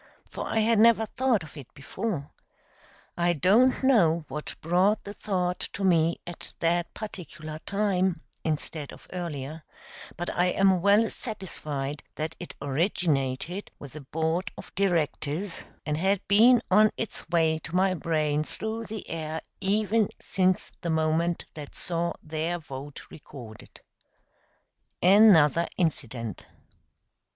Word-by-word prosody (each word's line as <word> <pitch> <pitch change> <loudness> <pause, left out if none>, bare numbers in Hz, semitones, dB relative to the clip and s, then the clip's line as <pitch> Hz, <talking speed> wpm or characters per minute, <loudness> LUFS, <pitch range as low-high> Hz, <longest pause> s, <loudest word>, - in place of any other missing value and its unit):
for - - -5
I 220 - +1
had 225 0 +3
never 225 0 +6
thought 245 -2 +1
of 160 - -13
it 140 -5 -10
before. 145 +1 -4 0.8
I 175 0 +2
don't 215 - +4
know 170 - +4
what 150 - -5
brought 185 +6 +2
the 205 - -7
thought 180 -4 -1
to 200 - -4
me 170 -3 +3
at 175 -1 -9
that 170 +1 +1
particular 170 -7 -7
time 190 -4 +1 0.2
instead 155 -1 -3
of - - -14
earlier, 160 -4 -5 0.6
but 175 - -3
I 180 - +3
am 190 0 +3
well 205 +4 +5
satisfied 150 - -4
that 155 +1 -3
it 175 - -8
originated 150 +2 -1
with 140 -3 -11
the 155 - -8
Board 160 +6 -1
of - - -10
Directors, 175 -1 -1 0.2
and 150 -1 -1
had 190 +3 +1
been 230 +4 +6
on 215 +3 +7
its 225 -6 -5
way 160 -2 +2
to 165 +2 -7
my 190 +1 +3
brain 155 -3 0
through 220 +7 -5
the 215 -1 -7
air 160 -1 -4 0.2
ever 210 +2 +2
since 185 -1 0
the 170 - -3
moment 160 +2 +1
that 150 -2 -9
saw 170 0 -1
their 160 +2 -2
vote 140 -2 -8
recorded. 120 -7 -12 1.2
Another 175 -5 +6
incident. 120 - -2
170 Hz, 130 wpm, -27 LUFS, 155-200 Hz, 1.2 s, on